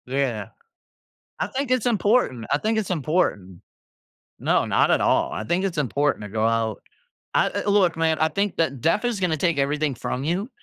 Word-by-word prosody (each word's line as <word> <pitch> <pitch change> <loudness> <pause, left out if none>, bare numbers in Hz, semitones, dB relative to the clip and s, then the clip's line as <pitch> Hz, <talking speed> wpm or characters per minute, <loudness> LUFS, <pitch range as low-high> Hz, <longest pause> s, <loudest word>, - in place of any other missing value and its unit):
Yeah. 130 -4 -2 0.9
I - - -1
think 270 -1 -4
it's 255 -3 +1
important, 210 - +1
I - - +3
think 220 +6 0
it's 210 -4 -2
important. 135 - -1 0.8
No, - - +2
not - - +2
at - - +3
all, - - +2
I 110 - -4
think 175 - 0
it's 185 -3 -2
important 145 -1 0
to 105 - -6
go 110 +2 0
out 115 -2 0 0.5
I - - +4
l - - -1
l 200 - +2
look, 185 -5 +3
man, 160 -1 +1
I 160 - +3
think 200 +5 -2
that 140 -6 0
death 165 - +1
is 240 -5 -1
gonna 175 -4 +1
take 165 -1 0
everything 145 +1 0
from 125 +2 -4
you, 180 +8 -1
160 Hz, 200 wpm, -23 LUFS, 130-195 Hz, 0.9 s, I